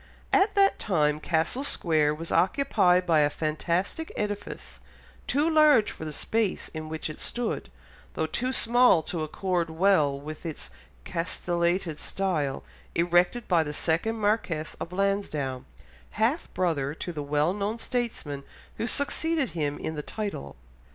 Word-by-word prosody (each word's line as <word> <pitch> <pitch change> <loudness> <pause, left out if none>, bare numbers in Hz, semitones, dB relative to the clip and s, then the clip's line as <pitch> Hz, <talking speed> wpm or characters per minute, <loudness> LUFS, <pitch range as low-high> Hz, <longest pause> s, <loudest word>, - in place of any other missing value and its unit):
At 405 +2 +4
that 395 -1 +4
time 150 -6 +1
Castle 165 - 0
Square 155 - +2
was 165 +2 -6
occupied 185 -5 +3
by 165 -3 +4
a 145 -1 +4
fantastic 170 - -2
edifice, 205 -1 -5 0.5
too 295 +3 +2
large 305 -8 +5
for 160 - -8
the 155 - -4
space 220 +6 -1
in 155 -1 -6
which 160 0 -4
it 155 - -7
stood, 240 -1 -3 0.5
though 160 - 0
too 250 +11 -2
small 240 -8 +4
to 165 0 -4
accord 170 +2 -1
well 160 -5 +3
with 155 +2 -8
its 155 - -6 0.3
castellated 170 - -1
style, 160 -8 -1 0.3
erected 175 +7 +2
by 175 -3 +4
the 150 -1 -5
second 175 +10 0
Marquess 205 -7 -1
of 170 - -5
Lansdowne, 180 -9 -1 0.5
half 235 +10 +1
brother 150 -6 0
to 175 - -5
the 150 - -4
well 150 +4 +1
known 205 +3 -2
statesman 230 - -3 0.3
who 225 - -1
succeeded 300 +1 0
him 145 -3 -2
in 160 - -4
the 150 - -4
title. 195 - -5
175 Hz, 145 wpm, -27 LUFS, 155-220 Hz, 0.5 s, large